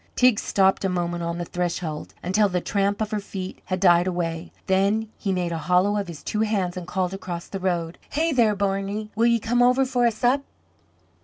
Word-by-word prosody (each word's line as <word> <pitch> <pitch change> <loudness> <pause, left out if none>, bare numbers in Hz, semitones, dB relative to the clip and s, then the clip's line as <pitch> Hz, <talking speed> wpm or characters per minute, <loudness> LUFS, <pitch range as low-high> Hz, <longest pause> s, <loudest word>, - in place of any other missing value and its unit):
Teig 250 -4 +4
stopped 190 0 +2
a 195 - +1
moment 175 -1 -2
on 170 0 -2
the 175 - -3
threshold 170 -3 -3
until 200 +3 +2
the 180 -1 0
tramp 200 +3 0
of 215 0 -1
her 215 - 0
feet 190 -2 -7
had 185 0 -2
died 175 -1 +5
away; 170 -2 -3
then 200 +4 +2
he 195 - -2
made 180 -2 -1
a 165 - -2
hollow 180 +5 +2
of 200 -2 -1
his 165 -4 -9
two 210 - -2
hands 200 -5 0
and 180 -1 -6
called 180 0 -1
across 180 -3 -5
the 195 - -6
road: 175 -3 -2
"Hey 320 +3 0
there, 230 -6 +3
Barney, 200 +2 -2
will 230 +2 +3
ye 235 0 +4
come 235 +2 +1
over 250 +2 +4
for 250 -2 +2
a - - +2
sup?" 245 +5 +1
195 Hz, 215 wpm, -24 LUFS, 175-215 Hz, -, died